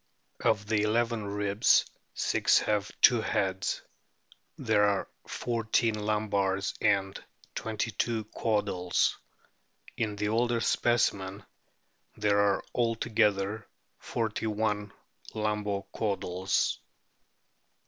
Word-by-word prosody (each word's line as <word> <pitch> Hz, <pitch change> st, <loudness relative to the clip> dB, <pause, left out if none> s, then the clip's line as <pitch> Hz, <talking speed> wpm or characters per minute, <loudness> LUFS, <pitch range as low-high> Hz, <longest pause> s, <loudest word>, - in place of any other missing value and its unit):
Of 105 Hz, -2 st, +2 dB
the 105 Hz, 0 st, +1 dB
eleven 115 Hz, 0 st, 0 dB
ribs 100 Hz, +1 st, +3 dB, 0.3 s
six -, -, +3 dB
have 105 Hz, -2 st, 0 dB
two 120 Hz, -2 st, +7 dB
heads. 95 Hz, -2 st, -1 dB, 0.7 s
There 105 Hz, -, +2 dB
are 100 Hz, -1 st, +1 dB, 0.2 s
fourteen 115 Hz, -1 st, 0 dB
lumbars 105 Hz, -2 st, 0 dB
and 95 Hz, -1 st, +1 dB, 0.3 s
twenty 110 Hz, +1 st, -3 dB
two 115 Hz, +1 st, -1 dB
caudals. 105 Hz, -5 st, 0 dB, 0.8 s
In 105 Hz, -2 st, -1 dB
the 105 Hz, 0 st, -1 dB
older 120 Hz, +1 st, +1 dB
specimen 100 Hz, -5 st, +1 dB, 0.7 s
there 105 Hz, -1 st, +2 dB
are 100 Hz, -1 st, +2 dB
altogether 110 Hz, -3 st, +1 dB, 0.3 s
forty 110 Hz, -1 st, -2 dB
one 105 Hz, -1 st, -1 dB, 0.4 s
lumbo 105 Hz, -2 st, -1 dB
caudals. 95 Hz, -3 st, -1 dB
105 Hz, 90 wpm, -29 LUFS, 100-110 Hz, 0.8 s, two